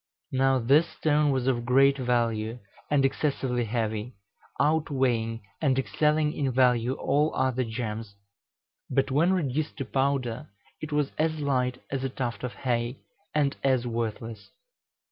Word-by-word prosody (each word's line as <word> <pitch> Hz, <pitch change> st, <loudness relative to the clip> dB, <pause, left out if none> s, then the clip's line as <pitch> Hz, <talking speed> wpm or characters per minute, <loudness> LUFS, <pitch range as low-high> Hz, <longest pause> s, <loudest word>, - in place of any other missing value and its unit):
'" -, -, -55 dB
Now, 135 Hz, 0 st, +3 dB
this 140 Hz, +7 st, +4 dB
stone 150 Hz, -1 st, +2 dB
was 130 Hz, -3 st, 0 dB
of 125 Hz, -3 st, +1 dB
great 135 Hz, +3 st, +5 dB
value 120 Hz, -3 st, 0 dB, 0.3 s
and 140 Hz, -2 st, +3 dB
excessively 135 Hz, -3 st, 0 dB
heavy, 110 Hz, +1 st, -2 dB, 0.4 s
outweighing 130 Hz, -7 st, +1 dB, 0.2 s
and 135 Hz, -4 st, +2 dB
excelling 150 Hz, +5 st, +1 dB
in 135 Hz, -2 st, -1 dB
value 125 Hz, -1 st, +3 dB
all 145 Hz, +3 st, +1 dB
other 130 Hz, -1 st, +1 dB
gems; 110 Hz, -2 st, -5 dB, 0.7 s
but 135 Hz, 0 st, +1 dB
when 160 Hz, +7 st, +3 dB
reduced 155 Hz, -4 st, -1 dB
to 135 Hz, -, -3 dB
powder, 135 Hz, 0 st, -1 dB, 0.3 s
it 155 Hz, -, -6 dB
was 150 Hz, -1 st, 0 dB
as 155 Hz, 0 st, +1 dB
light 125 Hz, -3 st, 0 dB
as 135 Hz, -1 st, -2 dB
a 135 Hz, -, -1 dB
tuft 125 Hz, -2 st, -4 dB
of 125 Hz, -, -3 dB
hay, 120 Hz, 0 st, -1 dB, 0.4 s
and 145 Hz, -2 st, +2 dB
as 130 Hz, -3 st, +2 dB
worthless. 115 Hz, -2 st, -4 dB
130 Hz, 145 wpm, -27 LUFS, 120-140 Hz, 0.7 s, great